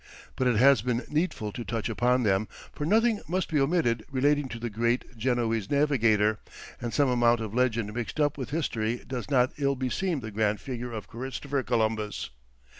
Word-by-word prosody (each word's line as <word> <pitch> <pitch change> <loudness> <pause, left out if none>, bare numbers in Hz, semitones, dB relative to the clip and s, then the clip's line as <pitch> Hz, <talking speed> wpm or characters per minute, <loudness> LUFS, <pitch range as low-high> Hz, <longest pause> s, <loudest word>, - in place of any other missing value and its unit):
But 130 - +1
it 125 - +3
has 135 +1 +6
been 120 +1 -1
needful 150 - -1
to 120 - -6
touch 115 -2 -3
upon 125 +1 +2
them, 100 0 +2 0.3
for 145 - -4
nothing 225 +2 +3
must 180 +3 -1
be 155 - +1
omitted 135 -6 +1
relating 145 +1 +1
to 115 - -6
the 115 0 -4
great 120 +3 -1
Genoese 115 -3 0
Navigator, 115 -8 +3 0.4
and 120 -1 -3
some 145 +2 +3
amount 120 -1 +3
of 110 -2 -5
legend 115 -4 0
mixed 120 +5 -4
up 145 -1 +2
with 130 -4 -5
history 120 -7 -2
does 125 -1 -5
not 130 -2 +3
ill 140 -1 +1
beseem 135 +5 -1
the 110 -1 -6
grand 105 0 0
figure 125 -2 -5
of 110 -5 -6
Christopher 135 +4 -3
Columbus. 110 - -1
120 Hz, 185 wpm, -28 LUFS, 110-140 Hz, 0.4 s, has